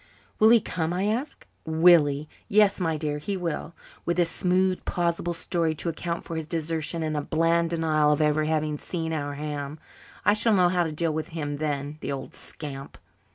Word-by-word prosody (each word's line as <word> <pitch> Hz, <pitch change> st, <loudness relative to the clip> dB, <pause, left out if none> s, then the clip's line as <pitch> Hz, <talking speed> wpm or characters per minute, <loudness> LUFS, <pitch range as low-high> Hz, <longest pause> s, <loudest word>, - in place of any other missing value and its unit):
"Will 220 Hz, -, +7 dB
he 235 Hz, 0 st, +7 dB
come?" 165 Hz, -4 st, -2 dB
I 185 Hz, +2 st, -1 dB
asked. 245 Hz, +8 st, -2 dB, 0.2 s
"Will 160 Hz, 0 st, +6 dB
he? 145 Hz, +2 st, -3 dB, 0.2 s
Yes, 205 Hz, -1 st, +4 dB
my 165 Hz, -3 st, 0 dB
dear, 150 Hz, -1 st, -2 dB
he 195 Hz, +6 st, -3 dB
will 170 Hz, -1 st, -4 dB, 0.3 s
with 170 Hz, -, -1 dB
a 175 Hz, -, +5 dB
smooth, 185 Hz, +2 st, +1 dB
plausible 170 Hz, 0 st, -1 dB
story 165 Hz, -2 st, -1 dB
to 170 Hz, -, -2 dB
account 170 Hz, +1 st, -3 dB
for 165 Hz, -, -6 dB
his 160 Hz, -1 st, -4 dB
desertion 160 Hz, 0 st, -2 dB
and 155 Hz, -1 st, -2 dB
a 150 Hz, -, 0 dB
bland 165 Hz, +2 st, +2 dB
denial 155 Hz, -3 st, +2 dB
of 150 Hz, -, +2 dB
ever 155 Hz, 0 st, +2 dB
having 155 Hz, -1 st, 0 dB
seen 165 Hz, -2 st, -3 dB
our 145 Hz, -2 st, -3 dB
ham. 145 Hz, 0 st, -4 dB, 0.5 s
I 205 Hz, -, +6 dB
shall 215 Hz, 0 st, +3 dB
know 180 Hz, -2 st, +5 dB
how 175 Hz, -1 st, +2 dB
to 160 Hz, -, -3 dB
deal 160 Hz, +1 st, -1 dB
with 155 Hz, 0 st, -3 dB
him 145 Hz, -2 st, -3 dB
then, 145 Hz, 0 st, -3 dB
the -, -, -3 dB
old 135 Hz, -1 st, -5 dB
scamp." 140 Hz, -2 st, -8 dB
160 Hz, 200 wpm, -26 LUFS, 150-175 Hz, 0.5 s, Will